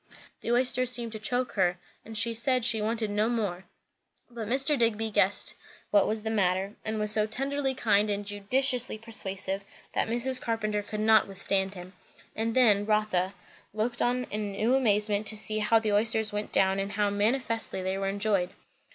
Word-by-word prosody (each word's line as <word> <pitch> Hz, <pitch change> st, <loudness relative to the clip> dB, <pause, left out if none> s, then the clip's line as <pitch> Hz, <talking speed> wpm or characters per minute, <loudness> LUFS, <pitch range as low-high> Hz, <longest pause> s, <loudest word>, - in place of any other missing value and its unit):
The 235 Hz, -, -4 dB
oysters 255 Hz, 0 st, +1 dB
seemed 235 Hz, -2 st, -1 dB
to 220 Hz, -, -7 dB
choke 245 Hz, +3 st, -1 dB
her; 180 Hz, -3 st, +1 dB, 0.3 s
and 225 Hz, 0 st, -2 dB
she 230 Hz, +2 st, +4 dB
said 250 Hz, +1 st, +1 dB
she 230 Hz, -3 st, +2 dB
wanted 220 Hz, 0 st, -2 dB
no 210 Hz, +2 st, +1 dB
more. 200 Hz, -6 st, -3 dB, 0.7 s
But 230 Hz, -3 st, -6 dB
Mr. 270 Hz, +5 st, +2 dB
Digby 225 Hz, -3 st, 0 dB
guessed 205 Hz, -1 st, +4 dB, 0.4 s
what 205 Hz, -1 st, +4 dB
was 215 Hz, 0 st, -2 dB
the 220 Hz, -, -2 dB
matter; 195 Hz, -1 st, 0 dB
and 220 Hz, 0 st, -3 dB
was 210 Hz, 0 st, +1 dB
so 215 Hz, 0 st, +2 dB
tenderly 270 Hz, +4 st, -2 dB
kind 210 Hz, -3 st, +2 dB
and 205 Hz, 0 st, -2 dB
judiciously 245 Hz, +5 st, +1 dB
persuasive, 195 Hz, -3 st, -2 dB, 0.3 s
that -, -, 0 dB
Mrs. 250 Hz, +3 st, -1 dB
Carpenter 215 Hz, -2 st, -2 dB
could 210 Hz, +1 st, -5 dB
not 220 Hz, 0 st, +4 dB
withstand 195 Hz, 0 st, -1 dB
him; 180 Hz, +1 st, -10 dB, 0.4 s
and 225 Hz, +1 st, -2 dB
then, 210 Hz, -5 st, +4 dB
Rotha 210 Hz, -3 st, 0 dB, 0.4 s
looked 235 Hz, +3 st, -2 dB
on 250 Hz, +1 st, +1 dB
in 210 Hz, -1 st, -3 dB
new 220 Hz, +5 st, 0 dB
amazement 210 Hz, -4 st, +2 dB
to 215 Hz, -, -1 dB
see 215 Hz, 0 st, -2 dB
how 215 Hz, +2 st, +3 dB
the 220 Hz, -2 st, 0 dB
oysters 220 Hz, 0 st, +1 dB
went 210 Hz, 0 st, -4 dB
down 190 Hz, 0 st, +2 dB
and 195 Hz, +1 st, -4 dB
how 205 Hz, -1 st, 0 dB
manifestly 225 Hz, -1 st, -1 dB
they 190 Hz, +1 st, -2 dB
were 195 Hz, 0 st, -2 dB
enjoyed. 200 Hz, -2 st, 0 dB
215 Hz, 180 wpm, -28 LUFS, 205-230 Hz, 0.7 s, she